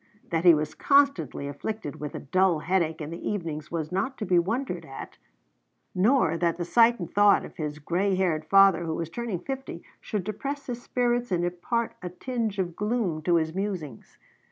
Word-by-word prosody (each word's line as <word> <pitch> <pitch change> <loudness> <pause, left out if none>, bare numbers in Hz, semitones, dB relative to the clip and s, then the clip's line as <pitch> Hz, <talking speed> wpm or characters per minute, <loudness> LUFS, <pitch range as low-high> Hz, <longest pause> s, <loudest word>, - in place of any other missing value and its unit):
That 165 +1 0
he 170 -2 +9
was 155 0 -2
constantly 275 - +2
afflicted 145 +3 -5
with 150 -1 -5
a - - -3
dull 185 +4 +2
headache 165 -3 0
in 150 +1 -5
the 170 - -7
evenings 165 -7 -4
was 160 -2 -3
not 200 +9 -1
to 215 - -3
be 180 -3 +4
wondered 190 -1 -2
at; 135 -3 -9 0.7
nor 185 - +3
that 170 -1 0
the 175 - -3
sight 235 +4 +4
and 175 - -4
thought 205 0 +5
of - - -13
his 150 -2 -4
gray 180 +6 0
haired 175 -5 0
father, 195 -3 +5
who 160 -1 -2
was 165 -1 -4
turned 225 -4 -4
fifty, 270 0 -5 0.2
should 210 -4 -3
depress 275 +8 -4
his 245 -1 -5
spirits 245 -2 0
and 175 -1 +1
impart 200 +7 -2
a 180 - -4
tinge 225 +2 -3
of 175 -3 -2
gloom 210 -7 -1
to 175 +2 +2
his 160 -1 +1
musings. 180 - -5
180 Hz, 190 wpm, -27 LUFS, 165-220 Hz, 0.7 s, he